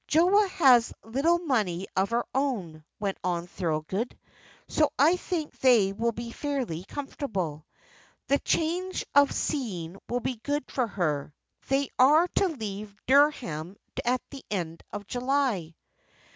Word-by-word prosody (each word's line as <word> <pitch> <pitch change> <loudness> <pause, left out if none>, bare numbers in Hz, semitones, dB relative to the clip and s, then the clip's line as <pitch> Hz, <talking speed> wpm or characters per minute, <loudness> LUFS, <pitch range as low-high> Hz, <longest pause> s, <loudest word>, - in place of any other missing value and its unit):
"Joa 370 +6 +4
has 255 -10 +5
a - - -16
little 295 +9 +3
money 215 - 0
of 190 +1 +2
her 235 +1 0
own," 205 - -2 0.2
went 200 -2 -2
on 175 -1 -1
Thorold, 175 +6 -3 0.5
"so 305 -2 +2
I 310 +6 +5
think 340 -4 -4
they 225 -7 +5
will 230 +3 0
be 235 +1 -6
fairly 250 - -3
comfortable. 195 - -4 0.6
The 280 - +2
change 360 +3 -1
of 285 0 +6
scene 195 - -3
will 245 - 0
be 255 -1 -2
good 290 +4 -3
for 250 -3 0
her. 150 -8 -2 0.3
They 270 +1 +1
are 300 +7 +6
to 390 - +2
leave 210 - -6
Dereham 240 - +2 0.3
at 245 +1 +1
the 275 -2 -9
end 170 -5 -3
of 205 0 -6
July." 245 - 0
240 Hz, 140 wpm, -28 LUFS, 190-285 Hz, 0.6 s, of